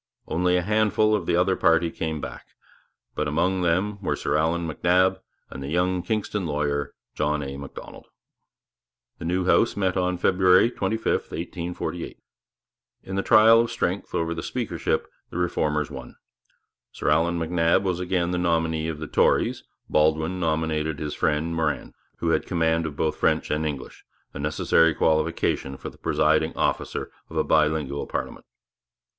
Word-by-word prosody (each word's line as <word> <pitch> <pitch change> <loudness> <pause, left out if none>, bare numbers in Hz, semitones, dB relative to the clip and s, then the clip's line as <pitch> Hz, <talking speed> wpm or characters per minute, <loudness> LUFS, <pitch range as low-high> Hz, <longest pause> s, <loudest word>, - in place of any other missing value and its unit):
Only 90 +2 +1
a 90 - 0
handful 110 +1 +2
of 100 -5 -1
the - - +2
other 90 +2 +3
party 85 -1 +3
came 80 -1 -3
back; - - -8 0.7
but 75 - -2
among 90 +5 +1
them 95 +4 0
were 95 - -1
Sir - - -1
Allan 80 +2 +1
MacNab 90 +4 +2 0.3
and - - -7
the 70 - -5
young 90 +3 +1
Kingston 105 -3 -2
lawyer, 75 -1 -2 0.2
John 75 0 -1
A. 70 0 -6
Macdonald. 70 -1 -10 1.1
The - - -6
new 90 +2 0
House 110 +5 +3
met 95 -2 +1
on 90 0 0
February 95 +4 +4
25, 110 -2 -2
1848. 85 0 -3 0.9
In 95 - -6
the 100 - +1
trial 115 +2 +6
of 115 - -1
strength 90 +3 -2
over 85 0 0
the 80 - -5
Speakership - - -2 0.2
the - - -7
Reformers 75 -4 0
won. 65 -3 -9 0.8
Sir - - -2
Allan 85 +3 +2
MacNab 85 +2 +2
was 90 -2 -1
again 90 -1 0
the 90 - -1
nominee 80 -2 0
of 80 -2 -3
the 80 - -6
Tories; - - +2 0.2
Baldwin 80 +4 +1
nominated 80 -2 -1
his 75 0 -4
friend, 80 +2 0
Morin, 80 -2 -2 0.2
who - - -1
had - - +1
command 80 -1 +1
of 75 - -7
both 75 0 -1
French 80 0 +1
and 75 +1 0
English, 70 -3 -7 0.3
a - - -7
necessary 80 +2 +2
qualification 80 -3 0
for - - -7
the - - -20
presiding - - +1
officer - - -1 0.2
of - - -7
a - - +3
bilingual 75 -2 +1
parliament. - - -5
85 Hz, 160 wpm, -25 LUFS, 80-90 Hz, 1.1 s, trial